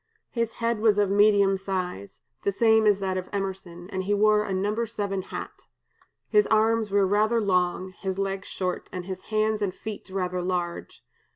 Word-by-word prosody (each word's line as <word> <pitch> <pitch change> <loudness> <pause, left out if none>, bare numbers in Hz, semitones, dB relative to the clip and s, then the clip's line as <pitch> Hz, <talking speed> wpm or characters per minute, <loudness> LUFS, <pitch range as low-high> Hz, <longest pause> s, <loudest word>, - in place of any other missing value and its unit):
His 230 -2 -1
head 230 -1 -1
was 215 -2 +3
of 205 -2 +2
medium 200 -1 +4
size, 185 - -5 0.2
the 200 - 0
same 220 +1 +4
as 205 -1 +3
that 190 -1 -1
of 185 - -8
Emerson, 190 -3 -5
and 190 -1 -3
he 205 +1 +2
wore 210 +1 +4
a - - -4
number 205 +5 0
seven 200 -3 -3
hat. - - -8 0.6
His 420 0 +3
arms 220 0 +2
were 200 0 +3
rather 215 +4 +2
long, 185 -2 0
his 190 0 -5
legs 195 0 -2
short, 185 -1 -3
and 180 -1 -5
his 185 -1 -7
hands 215 0 0
and 195 -2 -1
feet 215 -2 -7
rather 180 -1 -2
large. 175 -1 -3
195 Hz, 180 wpm, -26 LUFS, 185-215 Hz, 0.6 s, medium